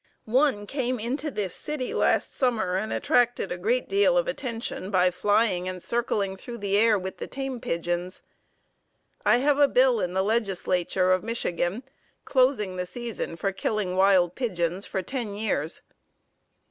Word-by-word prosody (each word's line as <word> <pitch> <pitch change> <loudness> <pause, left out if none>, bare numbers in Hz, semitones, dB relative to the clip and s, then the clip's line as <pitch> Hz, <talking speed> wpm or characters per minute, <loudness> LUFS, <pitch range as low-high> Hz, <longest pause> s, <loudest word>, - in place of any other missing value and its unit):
One 250 -2 +2
came 255 +1 -2
into 265 +7 -2
this 205 - -3
city 295 -4 -4
last - - +1
summer 220 -8 0
and 215 +3 -2
attracted 245 -8 +1
a - - -1
great 235 +7 0
deal 410 +6 +3
of - - +2
attention 235 - -4
by 185 -2 +3
flying 200 -1 +1
and 185 0 -5
circling 200 -3 -1
through 235 +5 -8
the 200 -2 -1
air 215 0 +5
with 190 0 -6
the - - -6
tame 270 -2 -4
pigeons. 175 +2 -3 1.0
I - - +6
have 285 +3 +2
a 285 - +7
bill 255 -3 +4
in 180 -1 -2
the 190 - +2
Legislature 190 -4 0
of 185 0 +3
Michigan, 210 -1 -2 0.4
closing 255 -8 +2
the 180 0 -3
season 230 -4 -5
for 195 +4 -1
killing 195 -1 -2
wild 190 -2 +4
pigeons 185 -6 -2
for 190 - -3
ten 230 -2 -4
years." 185 -7 -2
210 Hz, 160 wpm, -26 LUFS, 185-245 Hz, 1.0 s, a